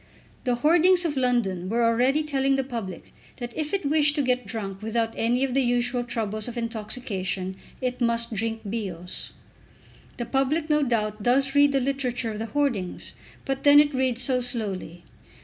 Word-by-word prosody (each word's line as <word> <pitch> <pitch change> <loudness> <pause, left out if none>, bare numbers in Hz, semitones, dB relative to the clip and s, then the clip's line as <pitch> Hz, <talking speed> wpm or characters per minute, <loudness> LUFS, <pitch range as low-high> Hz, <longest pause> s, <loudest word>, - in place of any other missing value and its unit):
The 250 -1 +2
hoardings 345 +7 +4
of 300 -3 -1
London 235 -9 0
were 235 +2 +1
already 250 +6 +3
telling 275 -2 +1
the 270 - 0
public 225 -9 -6 0.2
that 240 -2 -6
if 305 -1 -3
it 395 -4 -1
wished 295 0 +3
to 290 - +1
get 250 -1 0
drunk 195 -4 -5
without 225 +1 -1
any 240 +3 +1
of 265 -2 0
the 270 - +3
usual 245 0 +1
troubles 220 -3 -3
of 245 0 -6
intoxication 210 -5 -3 0.3
it 250 0 -2
must 235 0 0
drink 225 +1 -2
Bios. 190 -5 -4 0.9
The 240 - -3
public 290 +5 0
no 300 0 +4
doubt 215 -5 0
does 265 +4 +2
read 285 0 +5
the 275 - +2
literature 255 -3 -1
of 210 - -6
the 225 - -3
hoardings, 245 -10 -1 0.3
but 270 -1 -2
then 290 0 +8
it 295 0 +4
reads 255 -2 +1
so 250 0 +1
slowly! 200 -8 -4
245 Hz, 175 wpm, -25 LUFS, 220-270 Hz, 0.9 s, then